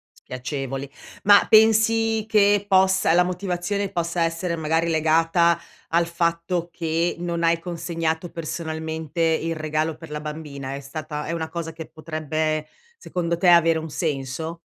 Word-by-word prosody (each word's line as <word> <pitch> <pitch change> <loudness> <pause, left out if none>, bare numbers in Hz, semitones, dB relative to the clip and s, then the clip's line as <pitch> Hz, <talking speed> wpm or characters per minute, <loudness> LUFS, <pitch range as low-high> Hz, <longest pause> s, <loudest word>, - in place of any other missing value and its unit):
Spiacevoli. 135 +1 -5 0.3
Ma 205 0 +7
pensi 220 0 +4
che 205 -1 +4
possa 190 -3 +4
la 180 - +5
motivazione 180 +2 -2
possa 170 0 -1
essere 165 +1 -1
magari 160 +1 0
legata 165 +1 +3 0.3
al 170 +1 +2
fatto 170 +1 -1
che 165 0 -1
non 170 -1 -3
hai 165 0 +3
consegnato 165 -1 -3
personalmente 160 0 -5
il 165 0 +1
regalo 155 0 -1
per 160 -1 -12
la 150 0 -4
bambina, 150 -3 -6
è 140 - -5
stata 150 +2 -6
è 165 - -3
una 160 -1 -3
cosa 165 0 -5
che 160 0 -8
potrebbe, 155 0 -3 0.3
secondo 175 - -2
te, 180 - +2
avere 165 -2 +6
un 160 -1 -6
senso? 155 +2 -3
165 Hz, 145 wpm, -23 LUFS, 155-175 Hz, 0.3 s, Ma